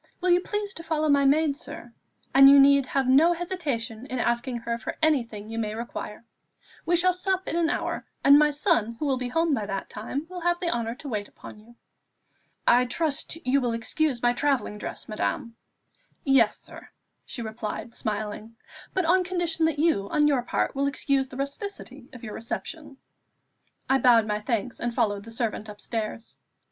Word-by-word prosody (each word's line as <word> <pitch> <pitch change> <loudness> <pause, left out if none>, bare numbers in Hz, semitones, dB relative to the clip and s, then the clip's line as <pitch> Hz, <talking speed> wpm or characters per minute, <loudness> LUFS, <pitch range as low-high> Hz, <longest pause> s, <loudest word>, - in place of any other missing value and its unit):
Will 365 -1 +1
you 350 - +5
please 415 +1 -3
to - - -8
follow 310 -1 0
my 280 -1 +4
maid, 290 +1 +3
sir; 290 -4 -8 0.4
and 275 0 +9
you 280 0 +8
need 275 -1 +5
have 270 -1 0
no 300 +7 +5
hesitation 275 -10 -4
in 255 - -4
asking 240 +1 0
her 235 0 -3
for 220 - -6
anything 235 -10 0
you 225 +1 -4
may 215 -1 -2
require. 230 -1 -7 0.6
We 350 - +3
shall 365 +1 +4
sup 375 +1 -1
in - - -2
an 335 -1 +2
hour, - - -3 0.2
and 280 +1 +8
my 300 0 +5
son, 290 - +1
who 300 - -3
will 270 -2 +1
be 250 -1 -3
home 325 +3 +1
by 215 -6 -1
that 195 -1 -4
time, 260 +8 -5
will 365 +1 -7
have 345 0 +1
the 345 -2 -1
honour 235 0 -2
to 285 - -10
wait 210 -5 -3
upon - - -13
you." 230 +3 -18 0.9
"I 245 +1 +5
trust 310 +4 -2
you 270 +2 +3
will 240 -2 0
excuse 245 +3 -1
my 240 0 +4
travelling 265 -5 -1
dress, - - -7
madame." 230 +2 -3 0.7
"Yes, 270 -6 +4
sir," - - -12 0.3
she 235 - -6
replied 220 +1 -5
smiling; 215 +1 -4 0.4
"but 375 -2 +1
on 365 +3 +4
condition 345 -3 0
that 315 -2 -2
you, 290 -11 +1
on 295 -1 +3
your 275 -4 +2
part, 240 - -1
will 280 0 0
excuse 275 -1 0
the 255 - -10
rusticity 280 - -6
of 245 - -12
your 215 -3 -6
reception." 290 +5 -6 0.9
I 270 0 +3
bowed 235 -4 +5
my 210 -1 -1
thanks, 230 +1 -2
and 240 -1 -3
followed 205 -4 0
the - - -10
servant 225 -2 -3
upstairs. 220 +2 -5
265 Hz, 190 wpm, -26 LUFS, 230-315 Hz, 0.9 s, and